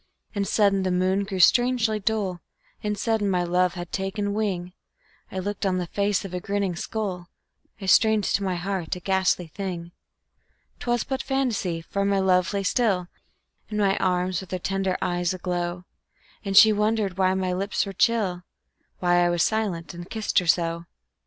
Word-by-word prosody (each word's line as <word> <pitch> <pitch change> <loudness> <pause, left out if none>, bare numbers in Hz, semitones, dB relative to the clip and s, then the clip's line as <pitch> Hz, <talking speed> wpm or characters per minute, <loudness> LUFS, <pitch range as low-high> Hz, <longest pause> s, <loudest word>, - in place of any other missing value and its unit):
And 200 -2 -1
sudden 200 -2 +3
the 190 - 0
moon 185 +2 +1
grew 195 -1 -4
strangely 240 +1 +4
dull, 195 -4 -1 0.4
And 210 0 -2
sudden 215 -1 0
my 180 -2 +1
love 180 +1 +1
had 175 -1 -7
taken 200 +1 -2
wing; 185 -4 -2 0.6
I - - -6
looked 205 +3 -3
on 190 -2 +1
the 180 - -1
face 200 +3 0
of 185 - -8
a 180 - -2
grinning 200 -1 -1
skull, 185 -2 -4 0.5
I 195 - -7
strained 220 +2 +4
to 200 - +1
my 190 -2 -1
heart 180 -1 -3
a - - -7
ghastly 190 -1 +1
thing. 175 0 -6 0.9
'Twas 240 -1 0
but 265 0 -3
fantasy, 240 -11 -1
for 200 +4 -2
my 200 0 +2
love 185 -2 +2
lay 200 -1 -1
still 195 -4 +1 0.6
In 210 - -3
my 200 -2 +3
arms, 180 0 0
with 190 - -11
her 185 - -2
tender 190 0 -1
eyes 175 0 0
aglow, 175 -1 -3 0.6
And 195 -2 0
she 220 0 +9
wondered 210 -3 0
why 185 0 +3
my 185 -1 -1
lips 195 +4 -1
were 195 - -6
chill, 195 -5 +1 0.6
Why 175 -1 +3
I 175 - +3
was 175 -1 +2
silent 195 -7 -1
and 175 +1 -9
kissed 220 -3 +1
her 180 - -5
so. 170 0 +1
190 Hz, 180 wpm, -25 LUFS, 180-205 Hz, 0.9 s, she